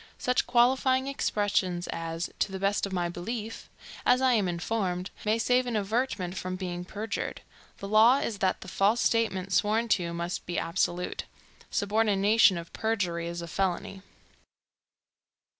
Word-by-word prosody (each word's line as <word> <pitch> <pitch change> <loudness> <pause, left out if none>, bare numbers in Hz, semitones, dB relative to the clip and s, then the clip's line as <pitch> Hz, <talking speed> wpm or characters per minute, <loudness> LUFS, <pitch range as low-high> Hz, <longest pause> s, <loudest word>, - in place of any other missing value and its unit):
Such 250 0 0
qualifying 260 +2 +3
expressions 205 -9 0
as 165 +1 -4
"to - - 0
the 190 - -4
best 200 +1 0
of - - -9
my 175 -2 0
belief," 215 +6 -6 0.3
"as 250 - +4
I 260 -1 +3
am 210 -5 +2
informed," 180 +1 -2
may 215 +1 +2
save 250 +2 +2
an 240 - -2
averment 210 -3 -1
from 185 0 -4
being 180 -1 -4
perjured. 215 +3 -4 0.4
The 200 - -7
law 220 +5 +6
is 220 -7 -3
that 190 -1 0
the - - -9
false 200 +5 +2
statement 195 -6 +1
sworn 220 +5 +2
to 175 -5 +1
must 170 +2 -4
be 175 - -3
absolute. 175 +1 -1 0.4
Subornation 205 -1 +3
of 170 0 -8
perjury 180 -7 -1
is 170 0 -5
a - - -6
felony. 190 +2 -2
195 Hz, 150 wpm, -28 LUFS, 180-225 Hz, 0.4 s, law